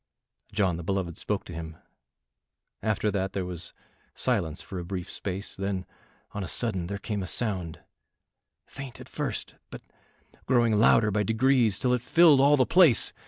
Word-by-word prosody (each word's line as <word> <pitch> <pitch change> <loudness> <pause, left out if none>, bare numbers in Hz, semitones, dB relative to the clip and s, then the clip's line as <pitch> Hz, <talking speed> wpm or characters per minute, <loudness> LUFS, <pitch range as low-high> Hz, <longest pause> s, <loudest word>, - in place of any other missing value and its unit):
John 95 -5 +1
the 85 - -6
beloved 95 -2 -2
spoke 105 -2 -2
to 85 - -9
him, 80 -1 -7 1.0
after 105 -1 0
that 95 -1 -2
there 95 -2 -2
was 90 -1 -7 0.4
silence 95 -10 -1
for 95 - -7
a - - -5
brief 90 0 -5
space, 95 +1 -5
then 95 -1 -3 0.5
on 100 - -4
a - - -5
sudden 95 -8 0
there 100 +2 -4
came 105 0 -4
a 95 - -5
sound, 90 -7 -2 0.8
faint 135 -3 -9
at - - -11
first, - - -4
but - - -10 0.6
growing 120 -3 +3
louder 110 -1 +5
by 105 +1 +1
degrees 115 0 +2
till 125 -1 +1
it 125 - 0
filled 160 0 +5
all 145 +1 +5
the 130 - +4
place. 165 - +5
100 Hz, 165 wpm, -27 LUFS, 90-120 Hz, 1.0 s, louder